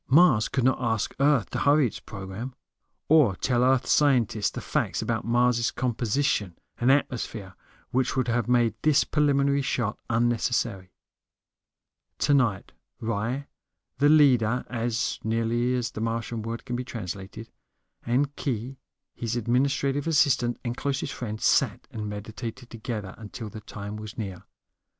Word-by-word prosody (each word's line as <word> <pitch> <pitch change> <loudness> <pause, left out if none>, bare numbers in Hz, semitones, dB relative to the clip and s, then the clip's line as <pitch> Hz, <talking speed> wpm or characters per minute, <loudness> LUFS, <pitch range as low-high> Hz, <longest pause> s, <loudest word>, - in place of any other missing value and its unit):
Mars 135 -7 +5
could 130 - 0
not 130 +1 +2
ask 110 -3 0
Earth 140 -5 +3
to - - -2
hurry 145 0 +4
its 115 - -4
program. 100 +6 -7 0.5
Or 145 -11 +5
tell 125 +4 +1
Earth 130 0 +3
scientists 120 -7 +3
the - - -6
facts - - -1
about - - -2
Mars' 120 0 +2
composition 120 - -1 0.2
and 125 +2 +4
atmosphere 115 -8 -1 0.4
which 130 0 +1
would 130 -2 +1
have 120 -1 0
made 120 -3 +3
this 155 -2 +4
preliminary 140 -2 +2
shot 120 -5 -1
unnecessary. 115 -4 0 1.3
Tonight 125 -9 +2 0.3
Ry, 115 +5 -2 0.5
the 145 +1 +5
leader 125 -6 +4
(as 115 -2 -1
nearly 115 +2 0
as 120 -3 -2
the 110 - -6
Martian 115 0 -2
word 115 +2 -5
can 120 - -3
be 125 - -2
translated), 105 -1 -7 0.5
and 140 +4 0
Khee, 130 0 -3 0.3
his 115 0 -3
administrative 135 +4 +1
assistant 135 -6 +2
and 120 0 -2
closest 140 0 -2
friend, 110 -3 -5
sat - - +2
and 105 -1 -5
meditated 115 +4 -7
together 110 -4 -5
until 110 +1 -7
the 110 - -8
time 105 0 -7
was 105 -1 -8
near. 95 -5 -6
120 Hz, 140 wpm, -26 LUFS, 110-130 Hz, 1.3 s, Mars